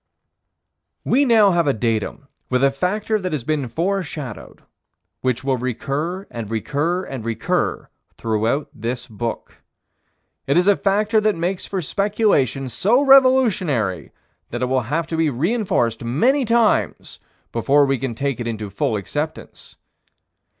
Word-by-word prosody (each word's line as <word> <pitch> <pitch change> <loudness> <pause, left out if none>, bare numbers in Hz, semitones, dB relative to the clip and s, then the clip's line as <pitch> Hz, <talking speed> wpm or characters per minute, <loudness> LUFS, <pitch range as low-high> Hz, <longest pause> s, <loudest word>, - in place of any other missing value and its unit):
We 280 +3 +3
now 220 -5 +5
have 170 -3 +1
a 140 - +3
datum 115 +4 -2 0.2
with 125 +1 +1
a 140 - +5
factor 205 +9 -1
that 185 -4 -3
has 145 -6 -2
been 150 -1 -1
foreshadowed; 160 - -4 0.6
which 130 -1 -1
will 135 -1 +1
recur 140 - -3
and 115 -3 -6
recur 150 - -1
and 130 -9 -6
recur 115 -1 -1 0.3
throughout 115 +6 -1
this 120 +2 -4
book. 115 0 -6 0.9
It 140 - +2
is 180 +2 +3
a 205 - +6
factor 210 +3 +1
that 215 -1 +2
makes 175 +3 -2
for 190 -3 -3
speculation 195 - +1
so 205 - +2
revolutionary 210 - +3 0.4
that 120 +1 -3
it 125 - 0
will 130 0 +2
have 165 +3 0
to 165 - -4
be 160 -1 +2
reinforced 140 - 0
many 245 - +2
times 230 -1 +1 0.3
before 140 +5 +3
we 135 -2 0
can 125 -2 -3
take 140 0 -2
it 120 - -3
into 110 -3 -4
full 105 +2 -1
acceptance. 150 +10 -5
145 Hz, 145 wpm, -21 LUFS, 120-195 Hz, 0.9 s, a